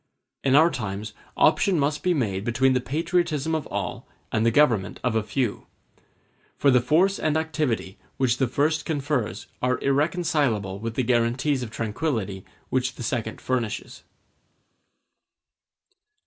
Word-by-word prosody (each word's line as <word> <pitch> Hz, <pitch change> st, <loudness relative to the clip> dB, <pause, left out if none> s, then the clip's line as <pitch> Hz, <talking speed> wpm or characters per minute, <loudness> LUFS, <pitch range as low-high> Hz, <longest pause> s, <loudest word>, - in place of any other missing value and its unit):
In 135 Hz, -1 st, +3 dB
our 160 Hz, +3 st, +6 dB
times 105 Hz, -1 st, -4 dB, 0.2 s
option 195 Hz, -3 st, +4 dB
must 145 Hz, +1 st, 0 dB
be 180 Hz, -1 st, +2 dB
made 100 Hz, -8 st, -1 dB
between 125 Hz, +3 st, +2 dB
the 125 Hz, -, +1 dB
patriotism 160 Hz, +2 st, 0 dB
of 155 Hz, -2 st, -1 dB
all -, -, -4 dB, 0.2 s
and 110 Hz, -, +1 dB
the 115 Hz, -, +4 dB
government 115 Hz, -6 st, +2 dB
of 125 Hz, -3 st, 0 dB
a 110 Hz, -, +3 dB
few; 120 Hz, +1 st, -2 dB, 0.9 s
for 140 Hz, -, +4 dB
the 125 Hz, -1 st, +5 dB
force 175 Hz, +10 st, +3 dB
and 155 Hz, 0 st, +1 dB
activity 150 Hz, -11 st, -2 dB, 0.2 s
which 130 Hz, -2 st, +2 dB
the 130 Hz, -, +1 dB
first 150 Hz, +5 st, +1 dB
confers 140 Hz, -, -2 dB, 0.2 s
are 125 Hz, 0 st, +1 dB
irreconcilable 140 Hz, -, 0 dB
with 115 Hz, +1 st, -4 dB
the 130 Hz, -, +1 dB
guarantees 125 Hz, +4 st, +1 dB
of 120 Hz, -, -4 dB
tranquillity 110 Hz, -, -3 dB, 0.3 s
which 130 Hz, 0 st, 0 dB
the -, -, -7 dB
second 115 Hz, -1 st, -3 dB
furnishes. 120 Hz, -4 st, -3 dB
130 Hz, 140 wpm, -25 LUFS, 115-150 Hz, 0.9 s, our